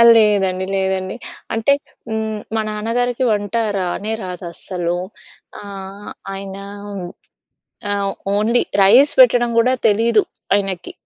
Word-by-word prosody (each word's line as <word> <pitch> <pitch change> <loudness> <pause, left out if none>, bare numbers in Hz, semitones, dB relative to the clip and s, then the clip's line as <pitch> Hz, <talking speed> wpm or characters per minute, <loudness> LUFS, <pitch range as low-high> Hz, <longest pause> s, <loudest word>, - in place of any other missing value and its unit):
లేదండి. 195 -4 +3
లేదండి. 190 -1 -1 0.4
అంటే 225 +5 +3 0.4
హ్మ్, 220 -1 -2 0.2
మా 220 - +2
నాన్న 210 +1 -4
గారికి 245 +1 0
వంట 205 +1 -1 0.2
రానే 195 +4 -2
రాదు 180 -1 -6
అస్సలు. 175 0 -3 0.6
ఆహ్, 200 0 -8 0.2
ఆయన 195 0 -6 1.4
ఆహ్, 200 -1 0 0.2
ఓన్లీ 225 +4 +3 0.2
రైస్ 245 +9 +6
పెట్టడం 240 -1 +6
గూడా 250 +3 +4
తెలీదు 220 +1 +3 0.3
ఆయనకి. 195 -3 -3
205 Hz, 110 wpm, -19 LUFS, 190-225 Hz, 1.4 s, రైస్